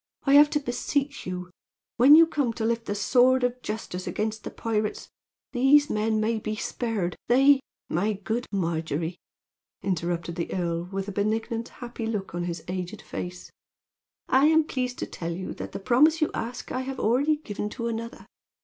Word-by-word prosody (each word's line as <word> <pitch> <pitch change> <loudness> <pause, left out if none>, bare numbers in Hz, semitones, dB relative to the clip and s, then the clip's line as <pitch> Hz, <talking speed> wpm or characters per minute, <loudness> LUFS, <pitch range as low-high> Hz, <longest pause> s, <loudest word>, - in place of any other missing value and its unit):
I 275 - +3
have 295 +1 +8
to 295 - +1
beseech 275 +1 -2
you, 180 0 -3
that 180 - -23 0.5
when 265 +5 +9
you 330 +1 +9
come 285 -7 -1
to 220 - -3
lift 230 0 -1
the 205 - -1
sword 250 +5 +4
of 245 0 0
justice 210 -4 -5
against 220 0 -2
the - - -5
pirates, 215 -2 -2 0.4
these 285 +3 +5
men 215 +1 +1
may 220 +1 0
be 215 0 -3
spared. 215 -5 -2
They 270 +3 +6 0.2
" - - -68
"My 200 +6 0
good 220 +5 -3
Margery," 165 -2 -2 0.7
interrupted 170 -2 -2
the 170 - -3
earl, 170 -2 -1
with 195 0 -3
a - - -3
benignant, 220 +3 -1
happy 235 -2 -6
look 210 -5 -3
on 175 0 -2
his 170 -2 -4
aged 180 -1 -5
face, 180 0 -7 0.8
"I 270 +3 +5
am 320 0 +5
pleased 250 -4 -3
to - - -2
tell 170 0 -5
you 185 +2 -5
that - - -7
the - - -5
promise 290 +10 +4
you 310 - +1
ask 235 +2 -5
I 255 - -1
have 265 0 -5
already 270 +8 +3
given 210 -8 -5
to 235 +2 -4
another. 230 0 -5
225 Hz, 185 wpm, -26 LUFS, 185-255 Hz, 0.8 s, when